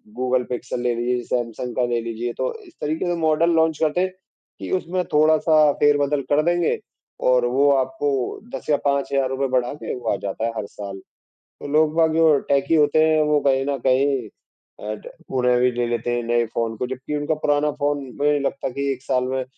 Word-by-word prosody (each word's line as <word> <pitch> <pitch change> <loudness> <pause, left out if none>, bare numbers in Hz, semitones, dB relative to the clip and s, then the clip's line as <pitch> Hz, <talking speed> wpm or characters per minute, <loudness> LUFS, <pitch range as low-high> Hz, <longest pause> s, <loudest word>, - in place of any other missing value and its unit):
Google 125 0 +1
pixel 125 0 -4
ले 120 -1 +1
लीजिए, 120 +1 -1
Samsung 120 0 -3
का 125 - +1
ले 120 -1 0
लीजिए 115 +1 -4
तो - - -1
इस 345 -3 -17
तरीके 155 +4 -2
से 175 -1 0
मॉडल 160 +2 +3
लॉन्च 160 -1 +2
करते 160 +3 +1
हैं, 185 - +1 0.5
कि - - -6
उसमें 180 +1 -2
थोड़ा-सा 155 0 +4
फेरबदल 145 -1 +3
कर 145 +1 +4
देंगे 175 -1 +1 0.5
और 125 -1 +4
वो 135 +4 +3
आपको 135 +1 0 0.5
10 - - -8
या 145 - +4
5000 140 0 0
हज़ार 135 -1 +1
रूपये 135 +1 -1
बढ़ा 125 +1 0
के 150 - -6
वो 120 -3 -4
आ - - 0
जाता 105 +3 -3
है 115 - -1
हर 105 - -3
साल। 100 -2 -8 0.4
तो - - -12
लोग 155 0 +3
बाग 160 -1 +3
जो 160 -3 +5
टेकी 140 +3 +2
होते 150 +1 +4
हैं 155 -1 +3
वो 150 - +4
कहीं 135 0 +2
न 140 - 0
कहीं 130 -2 +2 0.6
अ, 105 +1 -3
ट - - -13 0.3
उन्हें 125 -1 +3
भी 125 0 +3
ले 120 0 -1
लेते 120 0 -2
हैं 120 - -2
नए 120 0 +1
फ़ोन 115 -1 -1
को। 125 - -2
जबकि 130 +3 -5
उनका 145 +2 -1
पुराना 145 0 +2
फ़ोन 145 -1 0
मुझे 145 +1 +2
नहीं 145 - +1
लगता 140 -1 -2
कि 140 +2 -2
1 130 - -12
साल 125 -1 0
में 130 - -1
140 Hz, 215 wpm, -22 LUFS, 125-150 Hz, 0.6 s, जो